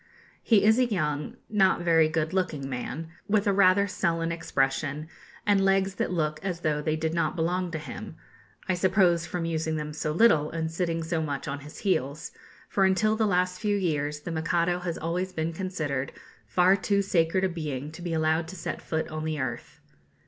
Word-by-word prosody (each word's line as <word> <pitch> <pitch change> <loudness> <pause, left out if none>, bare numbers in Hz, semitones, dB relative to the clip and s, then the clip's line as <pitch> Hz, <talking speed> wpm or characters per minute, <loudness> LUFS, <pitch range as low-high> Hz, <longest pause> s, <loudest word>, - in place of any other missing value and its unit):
He 220 -4 +4
is 220 +3 +5
a 255 - +5
young, 150 -8 -2
not 190 -4 +3
very 165 -2 +4
good 160 +1 -1
looking 170 -8 -1
man, 135 +5 -5 0.2
with 205 0 +2
rather 200 -1 +5
a - - -2
sullen 170 -3 -1
expression, 145 -2 -1 0.4
and 200 -2 +3
legs 195 0 +2
that 190 - -2
look 155 -3 -1
as 180 -3 -3
though 150 -2 0
they 155 +1 0
did 160 0 -2
not 170 - 0
belong 180 +2 0
to 165 - -4
him 150 -5 -8 0.5
I 185 - +2
suppose 180 -2 +3
from 175 -1 -3
using 160 -1 -1
them 150 -1 -4
so 155 0 -2
little, 155 -5 +4
and 160 -1 -3
sitting 165 -1 -1
so 165 0 -1
much 145 -3 -3
on 140 0 -3
his 150 +2 -11
heels; 160 -4 0 0.4
for 195 - +1
until 190 +3 +3
the 220 -1 +2
last 180 -1 +1
few 205 -2 +1
years 150 -5 -1
the 170 - -5
Mikado 170 +2 +1
has 175 -2 -3
always 180 +3 -2
been 160 0 -2
considered 155 -7 -3 0.3
far 180 - +4
too 200 +1 +1
sacred 185 0 +1
a 190 - +2
being 150 -4 -4
to 160 - -10
be 175 -1 -4
allowed 160 +1 +1
to 185 - -8
set 170 - -5
foot 160 0 -2
on 155 -1 -4
the 155 -1 -2
earth. 120 -3 -5
165 Hz, 195 wpm, -27 LUFS, 155-185 Hz, 0.5 s, is